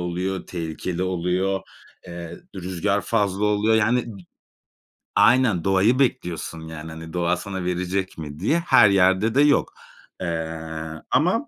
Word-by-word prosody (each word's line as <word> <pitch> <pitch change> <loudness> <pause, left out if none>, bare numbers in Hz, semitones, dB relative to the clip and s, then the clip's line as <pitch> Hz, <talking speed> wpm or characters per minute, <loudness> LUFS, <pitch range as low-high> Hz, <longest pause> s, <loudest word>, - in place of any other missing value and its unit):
oluyor, 90 +2 -3
tehlikeli 85 +1 -4
oluyor, 95 +1 0 0.5
eee, 85 -1 -8 0.2
d - - -6
rüzgâr 95 +2 -1
fazla 100 -2 0
oluyor. 105 +1 +2
Yani, 120 +3 +2
d - - -13 0.9
aynen 115 -8 +4
doğayı 95 +7 +3
bekliyorsun 90 - -1
yani, 80 0 -8
hani, 80 +1 -9
doğa 85 0 +1
sana 95 -1 -5
verecek 90 +1 -2
mi 75 -2 -7
diye. 150 - +2
Her 165 -10 +6
yerde 95 +4 +3
de 140 - +5
yok. 145 -1 +3 0.5
Eee, 80 -2 -3 0.5
ama - - +2
95 Hz, 135 wpm, -23 LUFS, 85-105 Hz, 0.9 s, Her